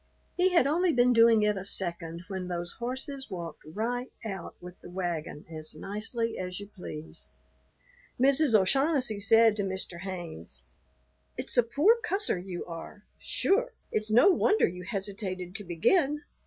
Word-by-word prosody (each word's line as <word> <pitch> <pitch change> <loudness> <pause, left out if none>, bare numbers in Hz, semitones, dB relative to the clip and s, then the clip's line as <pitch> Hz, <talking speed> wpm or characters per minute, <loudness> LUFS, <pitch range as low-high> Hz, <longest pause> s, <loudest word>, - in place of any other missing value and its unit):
He 365 +1 +3
had 345 -7 +4
only 340 +5 +2
been 245 -3 +4
doing 230 -2 +6
it 210 -1 +2
a 190 - -4
second 170 -3 0
when 190 -2 -4
those 175 -1 -3
horses 265 +3 -4
walked 170 -4 -6
right 230 +10 -3
out 190 -5 -6
with 180 0 -12
the - - -11
wagon 175 -5 -4
as 155 -1 -8
nicely 225 +6 -3
as 180 0 -4
you 205 - -7
please. 170 -6 -8 0.9
Mrs. 270 -3 +5
O'Shaughnessy 265 - +2
said 225 +2 +5
to 205 - 0
Mr. 190 -2 -4
Haynes, 175 - -7 0.7
"It's - - -4
a 245 - +7
poor 300 - +3
cusser 405 - -1
you 180 -1 -6
are. 175 +5 -9 0.2
Sure, - - +1 0.2
it's 215 0 -1
no 240 - +6
wonder 415 +4 +3
you 180 +1 -7
hesitated 190 -2 -4
to 205 - -8
begin. 285 - +1
205 Hz, 155 wpm, -29 LUFS, 180-255 Hz, 0.9 s, a